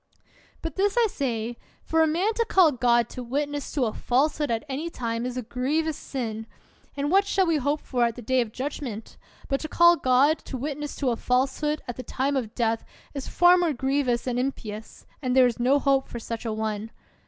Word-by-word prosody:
But 325 -3 -5
this 400 +3 +1
I 475 - +5
say: 240 - -2 0.3
For 325 0 +2
a 320 - +5
man 360 +8 +1
to 465 +1 0
call 370 -7 +5
God 240 -2 +2
to 255 - -7
wit 275 +5 -1
ness 290 -1 -5
to 275 -4 +1
a 220 - -2
falsehood 295 +4 +1
at 230 +3 -1
any 290 +5 -3
time 230 -4 -3
is 250 0 -5
a 250 - -2
grievous 295 +7 -1
sin! 225 -6 -5 0.5
And 285 +2 -1
what 390 +2 +5
shall 380 -1 +2
we 330 -2 +2
hope 290 +2 0
for 245 -2 0
at 230 -1 -1
the 245 - -9
Day 260 +3 +2
of 225 -3 -4
Judg 275 +6 -4
ment? 225 -5 -7 0.3
But 275 - 0
to 310 - -5
call 345 +1 +5
God 270 +4 +3
to 265 - -5
witness 295 +2 -4
to 265 -4 0
a - - 0
falsehood 270 +5 0
at 245 - -5
the - - -4
time 270 +3 -1
of 240 -4 -3
death 225 -2 0 0.3
is 275 -2 -5
far 355 +1 +5
more 340 -4 +1
grievous 265 -2 0
and 250 -1 -1
impious, 220 -5 -5 0.2
and 255 -2 0
there 260 -1 +7
is 245 -1 0
no 255 +4 +4
hope 275 -1 +2
for - - -7
such 230 0 -6
a 225 - -1
one. 215 0 -3
265 Hz, 220 wpm, -26 LUFS, 240-300 Hz, 0.5 s, there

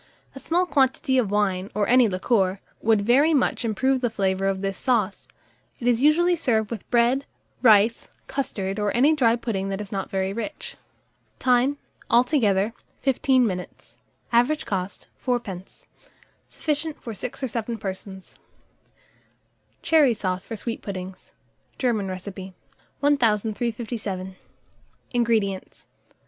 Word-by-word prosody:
A 270 - -9
small 350 +6 +1
quantity 265 -4 +2
of 225 -6 0
wine, 195 -2 0
or 210 -1 +1
any 250 -2 +5
liqueur, 190 0 +1 0.2
would 220 -2 +3
very 280 +8 +4
much 265 - +1
improve 260 +4 +1
the 245 - +1
flavour 195 -3 0
of 195 -1 -1
this 195 0 -2
sauce: 215 -6 -1 0.5
it 240 - -3
is 240 -1 +3
usually 345 +5 +4
served 225 -9 0
with 225 -4 -6
bread, 245 +3 +2 0.3
rice, 220 -1 +4 0.2
custard, 195 -7 -3
or 210 -1 0
any 285 +6 +5
dry 235 -6 +3
pudding 205 -5 -3
that 195 0 -3
is 205 -2 -7
not 195 -2 -3
very 190 0 -1
rich. 230 +8 -6 0.6
Time. 255 +3 +2 0.3
Altogether, 230 -5 +3 0.3
15 265 -1 +3
minutes. 180 -4 -6 0.3
Average 245 +6 +2
cost, 190 -2 -4 0.2
4d. 210 -8 -4 0.6
Sufficient 305 0 -2
for 230 - -7
6 250 +6 -6
or - - +1
7 230 0 -3
persons. 190 -1 -8 1.4
CHERRY 295 -7 +4
SAUCE 185 -2 -3
FOR 225 - -5
SWEET 230 +2 -4
PUDDINGS. 185 -1 -8 0.4
(German 225 -6 0
Recipe.) 185 0 -7 0.5
1357. 220 -6 0 0.8
INGREDIENTS. 225 -6 -1
225 Hz, 130 wpm, -24 LUFS, 195-255 Hz, 1.4 s, any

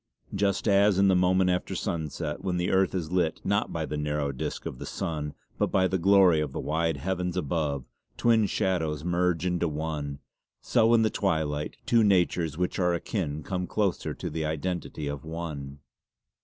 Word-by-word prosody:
Just 100 +2 0
as 100 -1 +4
in 100 0 +5
the 95 - +4
moment 90 0 +3
after 90 +1 -2
sunset, 80 -5 -3
when 90 -2 -1
the 90 0 0
earth 95 0 +2
is 85 -3 -3
lit 90 -3 +1
not 100 +2 0
by 80 -1 -2
the 75 - -4
narrow 75 -1 -1
disc 65 - -5
of 65 - -5
the - - -6
sun 75 -3 -3 0.2
but - - +3
by 95 -1 +3
the 95 0 -1
glory 95 -2 +5
of 75 -3 -3
the - - -3
wide 80 0 0
heavens 90 +3 -2
above, 75 -5 -1 0.3
twin 115 -3 +4
shadows 80 -7 -1
merge 90 0 +1
into 90 -1 +1
one, 75 -2 -3 0.4
so 115 0 +3
in 115 - +4
the 110 - +2
twilight 80 -6 -1
two 115 -2 +4
natures 90 -5 +2
which 90 +1 -1
are 90 -1 +2
akin 80 -4 -3
come 90 0 -3
closer 100 -4 -1
to - - -5
the 80 +1 -2
identity 80 0 -3
of 70 -1 -4
one. 80 -4 -6
85 Hz, 185 wpm, -27 LUFS, 75-95 Hz, 0.4 s, in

